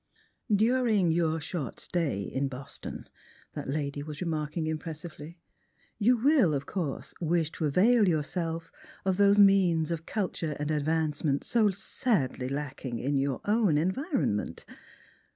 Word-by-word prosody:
*' - - -49 0.2
During 220 -9 +2
your 160 -1 +1
short 155 -3 -5
stay 150 - -1
in 135 +7 -2
Boston," 135 0 -7 0.5
that - - -6
lady 145 0 -2
was 150 0 -7
remark 155 -3 -3
ing 160 - 0
impressively, 160 +1 -6 0.6
"you 240 +4 +4
will, 245 - +4
of 140 0 -3
course, 160 -7 -4
wish 165 -1 +1
to 160 - -3
avail 205 - +4
yourself 165 +1 -2 0.3
of 190 -1 +1
those 200 0 +5
means 185 -5 +5
of 165 0 -4
culture 175 -7 -2
and 150 +1 -1
advancement 150 -1 0
so 225 -3 +3
sadly 180 - -1
lacking 135 -3 -4
in 140 +5 -1
your 135 -1 -1
own 205 -7 +3
environment. 190 - -1
160 Hz, 135 wpm, -29 LUFS, 145-195 Hz, 0.6 s, those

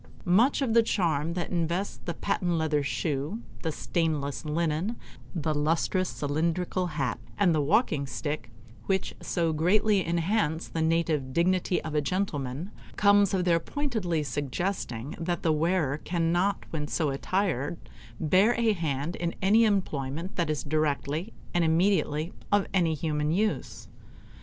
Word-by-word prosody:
Much 230 +11 +4
of 235 -4 0
the 230 - +7
charm 165 -7 0
that 175 -1 -3
invests 175 +3 -1
the 170 - -3
patent 175 +1 -1
leather 160 -2 +1
shoe, 150 - -2 0.2
the 160 - -1
stainless 150 -4 -1
linen, 165 +7 0 0.4
the 155 -2 0
lustrous 165 +5 +1
cylindrical 170 +5 -1
hat, 140 -7 -2 0.2
and 190 -5 +4
the 155 - +2
walking 145 - +2
stick, 145 -3 -4 0.4
which 190 -1 0
so 165 -2 0
greatly 195 +5 +3
enhance 170 0 0
the 165 - -3
native 160 -5 +1
dignity 180 +2 +2
of 155 - -5
a 150 - +2
gentleman, 150 -2 -2 0.2
comes 205 -1 +5
of 185 -2 0
their 170 -2 +4
pointedly 215 - -2
suggesting 145 - -3
that 175 0 -2
the 160 - +3
wearer 155 -3 +1
cannot 175 +4 0
when 150 -2 -3
so 150 -1 0
attired 165 0 -1 0.4
bear 190 +9 +4
a 230 -2 +3
hand 160 -2 -2
in 170 -1 -2
any 215 +4 +5
employment 165 -5 -1
that 170 -3 0
is 155 -1 -1
directly 155 +4 -1 0.2
and 175 - +3
immediately 165 -1 +2 0.2
of 205 -1 +4
any 170 -4 +2
human 150 0 -1
use. 210 +5 -1
165 Hz, 140 wpm, -28 LUFS, 150-185 Hz, 0.4 s, the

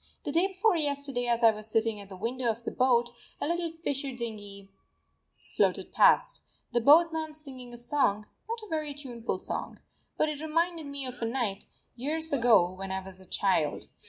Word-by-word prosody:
The 290 - -2
day 340 +5 +3
before 390 +1 +2
yesterday, 280 -5 -1
as 235 0 +1
I 225 - +8
was 215 0 -7
sitting 225 -1 +1
at 200 -1 -10
the 190 - -9
window 235 +4 -1
of 225 +1 -2
the - - -3
boat, 240 -2 +3 0.3
a - - -1
little 340 0 0
fisher 285 -4 -3
dinghy 205 -5 -6 0.8
floated - - +1
past, - - +4 0.3
the 240 - +2
boatman 315 +3 +5
singing 260 -5 -10
a 240 - -9
song 240 -4 +1 0.2
not 460 -1 -3
a 415 - -15
very 305 -2 -2
tuneful 245 -5 -4
song. - - -5 0.4
But 310 - +3
it 300 -1 -4
reminded 330 0 0
me 280 -1 -4
of 250 -1 -7
a - - 0
night, 225 -5 -2 0.3
years 310 +5 -1
ago, 230 -9 +5
when 190 +1 -6
I 190 - -1
was 190 -1 -10
a 190 - -15
child. 165 -7 0
255 Hz, 190 wpm, -29 LUFS, 225-305 Hz, 0.8 s, I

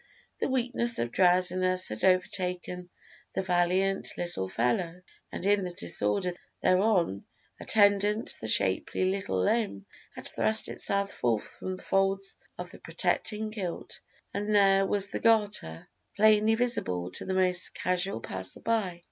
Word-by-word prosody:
the - - -1
weakness 245 -2 +1
of 120 0 -2
drowsiness 185 +1 +2
had 110 0 -6
overtaken 180 -1 0 0.5
the - - +1
valiant 185 +2 +1
little 175 - -3
fellow, 165 - -1 0.3
and - - -6
in 200 0 +3
the 180 - -3
disorder 105 - -1 0.3
thereon 185 - +2 0.4
attendant 205 +1 +2
the 110 - -4
shapely 100 - +2
little 190 - -2
limb 100 - 0 0.3
had - - -9
thrust 220 0 +2
itself 200 0 0
forth 115 -3 -1
from 185 0 -7
the - - -12
folds 195 0 0 0.2
of - - -7
the - - -13
protecting 215 0 -2
kilt, 190 -6 -6 0.3
and 205 +1 -1
there 195 -1 +4
was 200 0 0
the - - -3
garter 205 - +1 0.3
plainly 215 +1 +4
visible 90 - -1
to - - -3
the 190 - -3
most 185 -1 +2
casual 180 -7 -1
passer 95 -3 -6
by. 210 -7 -1
185 Hz, 140 wpm, -28 LUFS, 175-205 Hz, 0.5 s, there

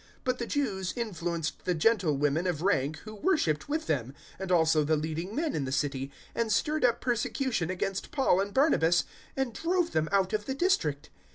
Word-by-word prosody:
013:050 - - -34
But 255 -1 -1
the 235 - -3
Jews 195 - -1
influenced 170 -8 -3
the 180 - +1
gentlewomen 160 -4 +2
of 170 -3 -2
rank 155 -6 +1
who 215 - -7
worshipped 215 - 0
with 310 +2 -1
them, 135 -3 -2 0.2
and 190 -1 -4
also 160 -3 +4
the 155 +2 +2
leading 160 +6 -4
men 310 -1 0
in 140 - -1
the 130 - -4
city, 140 -1 -1 0.2
and 230 -1 -1
stirred 305 +7 +1
up 240 -2 +3
persecution 240 - 0
against 190 +1 -2
Paul 260 -10 +2
and 200 +1 -3
Barnabas 185 - +3 0.3
and 265 -3 -1
drove 345 +5 0
them 155 0 0
out 195 0 +2
of 210 -1 -1
the 265 - -2
district. 160 - 0
190 Hz, 190 wpm, -29 LUFS, 155-250 Hz, 0.3 s, also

